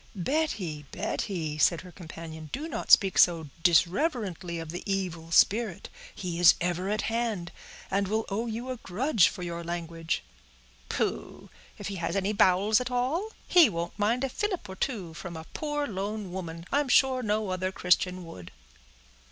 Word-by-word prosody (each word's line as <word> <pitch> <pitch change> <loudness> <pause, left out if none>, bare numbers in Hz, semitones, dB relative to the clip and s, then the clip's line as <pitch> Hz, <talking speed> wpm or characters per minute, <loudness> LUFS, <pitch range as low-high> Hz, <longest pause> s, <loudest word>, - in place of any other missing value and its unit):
"Betty, 190 - -1
Betty," 175 -6 -3
said 165 +2 +4
her 180 - -12
companion, 160 -3 -9
"do 305 +4 -4
not 240 -8 -5
speak 195 -3 +6
so 165 -4 +4
disreverently 180 - +1
of 165 -1 -6
the 175 - -5
evil 175 -4 -3
spirit; 205 +2 +3 0.3
he 175 -3 -4
is 175 -1 +8
ever 180 +2 -1
at 215 +1 0
hand, 225 -6 -2 0.4
and 195 0 +1
will 220 +3 0
owe 220 +4 -2
you 235 +3 -4
a 255 - -4
grudge, 220 - +2
for 180 - -5
your 170 -1 -4
language." 165 -1 -3 0.7
"Pooh! - - -3 0.3
if 205 - -5
he 200 - -5
has 170 +1 -2
any 200 +1 0
bowels 210 +2 +4
at 250 - -3
all, 260 - 0 0.2
he 340 -8 +7
won't 170 +1 -4
mind 230 +5 +1
a 270 - 0
fillip 370 - -2
or 190 - -8
two 190 - -3
from 170 0 -7
a 160 - -8
poor 295 -1 -2
lone 205 -2 -4
woman; 170 -2 -6
I'm 285 -1 +1
sure 260 0 +4
no 215 -2 0
other 185 0 -1
Christian 180 0 +1
would." 90 - -10
190 Hz, 170 wpm, -28 LUFS, 170-230 Hz, 0.7 s, is